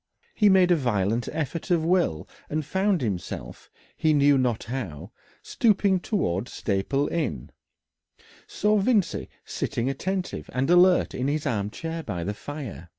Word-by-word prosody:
He 210 Hz, -2 st, +4 dB
made 185 Hz, -2 st, +5 dB
a -, -, +6 dB
violent 115 Hz, -, 0 dB
effort 160 Hz, +3 st, -4 dB
of 170 Hz, -3 st, +2 dB
will 170 Hz, -, +1 dB, 0.2 s
and 155 Hz, 0 st, -2 dB
found 190 Hz, +3 st, +1 dB
himself, 90 Hz, -, -5 dB, 0.3 s
he 155 Hz, -1 st, +2 dB
knew 145 Hz, -1 st, +5 dB
not 125 Hz, -4 st, 0 dB
how, 100 Hz, -, -6 dB, 0.3 s
stooping 200 Hz, -4 st, +2 dB
towards 120 Hz, -, -1 dB
Staple 110 Hz, +8 st, -1 dB
Inn, 140 Hz, -, -3 dB, 1.0 s
saw 210 Hz, +1 st, +1 dB
Vincey 205 Hz, -2 st, +1 dB, 0.2 s
sitting 125 Hz, +4 st, -2 dB
attentive 185 Hz, +6 st, -4 dB
and 135 Hz, +5 st, +1 dB
alert 180 Hz, +1 st, +5 dB
in 130 Hz, -, -2 dB
his 150 Hz, +1 st, -1 dB
arm 105 Hz, -7 st, -1 dB
chair 165 Hz, +7 st, -5 dB
by 95 Hz, -, -4 dB
the 100 Hz, +4 st, -2 dB
fire. 125 Hz, -, -8 dB
145 Hz, 145 wpm, -25 LUFS, 110-180 Hz, 1.0 s, a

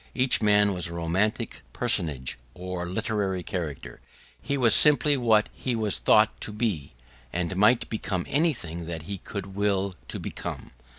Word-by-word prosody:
Each 130 Hz, -1 st, +2 dB
man 105 Hz, -1 st, +4 dB
was 90 Hz, -2 st, -2 dB
a 85 Hz, -, -8 dB
romantic 85 Hz, +6 st, -1 dB
personage 65 Hz, -7 st, 0 dB, 0.2 s
or 90 Hz, -1 st, -5 dB
literary 100 Hz, -2 st, -2 dB
character: 75 Hz, -, -6 dB, 0.4 s
he 140 Hz, -, -2 dB
was 120 Hz, -5 st, +5 dB
simply 150 Hz, -1 st, +6 dB
what 115 Hz, -5 st, +3 dB
he 125 Hz, -2 st, -3 dB
was 110 Hz, -3 st, 0 dB
thought -, -, +3 dB
to -, -, -4 dB
be, 105 Hz, -, -2 dB, 0.4 s
and 90 Hz, +1 st, -2 dB
might 105 Hz, +5 st, +4 dB
become 100 Hz, -5 st, -3 dB
anything 100 Hz, -, -1 dB
that 80 Hz, -2 st, -5 dB
he 100 Hz, +3 st, -6 dB
could 100 Hz, 0 st, -7 dB
will 100 Hz, -1 st, 0 dB
to -, -, -5 dB
become. -, -, -6 dB
100 Hz, 155 wpm, -26 LUFS, 85-110 Hz, 0.4 s, simply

